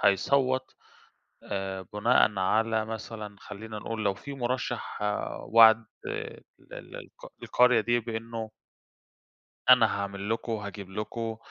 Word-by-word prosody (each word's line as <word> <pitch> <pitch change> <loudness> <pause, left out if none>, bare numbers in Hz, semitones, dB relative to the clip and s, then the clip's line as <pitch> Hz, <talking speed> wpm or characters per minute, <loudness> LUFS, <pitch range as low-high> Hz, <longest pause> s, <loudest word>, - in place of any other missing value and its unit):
هيصوَّت 130 +6 +2 0.7
آآ 95 -1 -4
بُناءً 105 -1 +3
على 110 +3 +2
مثلًا 110 -1 -7
خلّينا 105 +2 -8
نقول 110 +1 -4
لو 100 -1 +2
في 140 +8 -9
مُرَشح 125 -1 -3 0.4
وعد 115 0 +7 0.2
ال - - -5 0.3
ال - - -9
الق - - -12
القرية 125 -2 +4
دي 120 +2 +1
بإنه 115 0 -5 1.2
أنا - - +8
هاعمل 100 0 -4
لكم، 115 +1 -2
وهاجيب 100 -3 -5
لكم، 110 +3 -4
110 Hz, 115 wpm, -28 LUFS, 105-115 Hz, 1.2 s, أنا